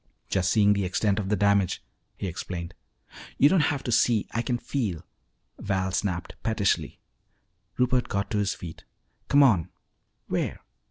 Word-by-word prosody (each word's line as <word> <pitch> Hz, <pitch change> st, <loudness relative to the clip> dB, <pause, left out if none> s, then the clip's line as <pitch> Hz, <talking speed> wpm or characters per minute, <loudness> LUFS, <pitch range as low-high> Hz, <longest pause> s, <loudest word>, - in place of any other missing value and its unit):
"Just 90 Hz, -2 st, +1 dB
seeing 105 Hz, -2 st, +5 dB
the 100 Hz, -1 st, 0 dB
extent 100 Hz, +3 st, +1 dB
of 95 Hz, -2 st, -3 dB
the 105 Hz, -, +3 dB
damage," 100 Hz, -2 st, +2 dB, 0.3 s
he -, -, -4 dB
explained. 85 Hz, -1 st, -5 dB, 0.6 s
"You 145 Hz, -, +6 dB
don't 190 Hz, -, +4 dB
have 140 Hz, -3 st, -2 dB
to 120 Hz, -, -2 dB
see, 115 Hz, -1 st, +3 dB
I 115 Hz, -, 0 dB
can 120 Hz, 0 st, -1 dB
feel!" 110 Hz, -, -3 dB, 0.5 s
Val 95 Hz, -2 st, -1 dB
snapped 90 Hz, -2 st, -2 dB
pettishly. 110 Hz, -3 st, 0 dB, 0.8 s
Rupert 125 Hz, 0 st, +2 dB
got 100 Hz, +3 st, -2 dB
to 105 Hz, -, +1 dB
his 100 Hz, -1 st, 0 dB
feet. 85 Hz, -3 st, -9 dB, 0.4 s
"Come 145 Hz, +1 st, +6 dB
on." 100 Hz, -, +3 dB, 0.6 s
"Where?" -, -, -2 dB
100 Hz, 155 wpm, -26 LUFS, 95-120 Hz, 0.8 s, You